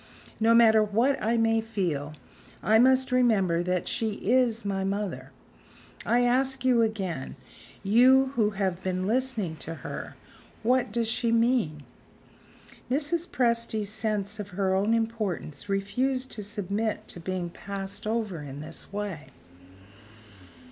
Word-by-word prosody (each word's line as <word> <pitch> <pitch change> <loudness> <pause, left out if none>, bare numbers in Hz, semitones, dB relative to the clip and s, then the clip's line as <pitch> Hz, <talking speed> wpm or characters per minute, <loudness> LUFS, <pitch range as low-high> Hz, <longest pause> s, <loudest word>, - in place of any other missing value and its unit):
"No 225 +1 +4
matter 220 -2 +6
what 230 +7 +1
I 230 +2 +1
may 225 0 +2
feel, 170 -10 -3 0.5
I 220 +1 +4
must 260 +2 +4
remember 210 -9 +3
that 180 0 -1
she 220 -2 -1
is 235 +1 +1
my 195 -1 -1
mother. 190 -10 -3 0.8
I 240 +3 +3
ask 260 +2 +1
you 245 -2 +4
again 195 -11 -2 0.5
you 260 +6 +5
who 220 -5 +2
have 190 -3 -2
been 185 0 -1
listening 225 -7 -1
to 165 +2 -7
her - - -6 0.5
what 250 -1 +2
does 230 +1 -1
she 230 +1 0
mean?" 230 - +1 1.1
Mrs. 310 +6 0
Presty's 230 -4 0
sense 215 -1 -2
of 205 - -4
her 190 -2 +1
own 205 +4 +2
importance 215 -6 -3
refused 255 +7 -1
to 215 - -5
submit 205 +1 -3
to - - -7
being 175 0 -4
passed 200 +3 -6
over 215 -7 -2
in 140 -1 -8
this 155 +5 -7
way. 200 -7 -5
215 Hz, 135 wpm, -27 LUFS, 190-235 Hz, 1.1 s, matter